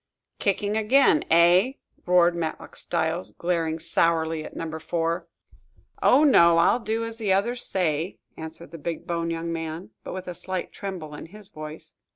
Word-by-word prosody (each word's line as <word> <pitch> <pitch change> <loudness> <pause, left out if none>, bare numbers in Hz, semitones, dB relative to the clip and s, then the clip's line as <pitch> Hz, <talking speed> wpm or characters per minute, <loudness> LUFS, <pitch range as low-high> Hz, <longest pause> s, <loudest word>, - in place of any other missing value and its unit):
"Kicking 205 +1 0
again, 270 +7 +4
eh?" 175 +9 +5 0.3
roared 175 -1 +5
Matlock 165 -2 -4
Styles, 160 +3 -2
glaring 165 -2 -1
sourly 165 -1 +1
at - - -10
Number 160 -1 -5
Four. 165 +2 -2 0.7
"Oh, 275 +4 +5
no; 170 - +6
I'll 170 +8 +4
do 225 0 -2
as 230 0 -7
the 215 -4 -1
others 235 +6 +1
say!" 170 -1 -1 0.2
answered 160 0 -9
the 165 - -9
big 165 +3 -4
boned 170 -1 -2
young 165 0 -3
man, 165 +2 -5
but - - -6
with 185 0 -6
a 180 - -4
slight 185 +1 -4
tremble 180 -7 -6
in 150 - -8
his 205 +2 -11
voice. 155 -2 -9
170 Hz, 165 wpm, -25 LUFS, 165-195 Hz, 0.7 s, no